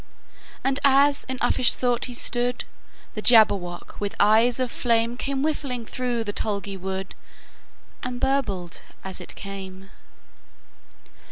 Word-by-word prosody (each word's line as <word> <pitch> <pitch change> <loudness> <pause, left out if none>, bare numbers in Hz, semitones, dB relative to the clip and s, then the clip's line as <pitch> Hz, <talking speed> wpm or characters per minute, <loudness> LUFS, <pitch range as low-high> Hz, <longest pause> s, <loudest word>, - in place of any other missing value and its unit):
And 270 +1 +1
as 280 +1 +4
in 260 0 -4
uffish 255 -2 +3
thought 245 -2 +1
he 245 - -6
stood, 245 0 0 0.5
The 215 - -5
Jabberwock, 200 -7 +3
with 205 -1 -3
eyes 225 +4 +4
of 255 -2 -1
flame, 230 -1 +1
Came 275 +2 -2
whiffling 275 -6 -2
through 245 -1 -2
the 205 -2 -4
tulgey 200 -2 -3
wood, 190 0 -5 0.9
And 250 0 -4
burbled 200 -11 -1 0.2
as 190 -1 -6
it - - -8
came! 195 -1 -8
235 Hz, 125 wpm, -24 LUFS, 200-255 Hz, 0.9 s, as